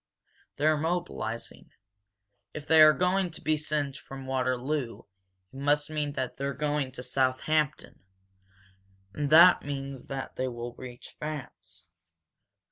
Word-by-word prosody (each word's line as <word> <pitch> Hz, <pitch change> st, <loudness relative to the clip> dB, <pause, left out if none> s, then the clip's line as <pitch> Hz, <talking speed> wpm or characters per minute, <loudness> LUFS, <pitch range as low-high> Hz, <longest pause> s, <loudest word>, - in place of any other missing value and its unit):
They're 155 Hz, +1 st, +2 dB
mobilizing. 160 Hz, -8 st, -4 dB, 0.8 s
If 150 Hz, -, -6 dB
they 160 Hz, 0 st, +6 dB
are 155 Hz, 0 st, +10 dB
going 180 Hz, +3 st, +1 dB
to 160 Hz, -, -9 dB
be 155 Hz, -, +2 dB
sent 150 Hz, -2 st, -2 dB
from 135 Hz, 0 st, -10 dB
Waterloo 130 Hz, 0 st, -2 dB, 0.5 s
it -, -, -14 dB
must 145 Hz, +2 st, +1 dB
mean 150 Hz, -2 st, -2 dB
that 130 Hz, -2 st, -4 dB
they're 140 Hz, -1 st, -3 dB
going 145 Hz, -3 st, -1 dB
to 125 Hz, -, -7 dB
Southampton 135 Hz, +4 st, 0 dB, 1.1 s
and 145 Hz, +4 st, -2 dB
that 170 Hz, +4 st, +8 dB
means 135 Hz, -2 st, -6 dB
that 135 Hz, -1 st, -6 dB
they 130 Hz, -, -1 dB
will 120 Hz, -1 st, -6 dB
reach 125 Hz, -1 st, -11 dB
France. 95 Hz, -, -8 dB
140 Hz, 125 wpm, -28 LUFS, 130-155 Hz, 1.1 s, are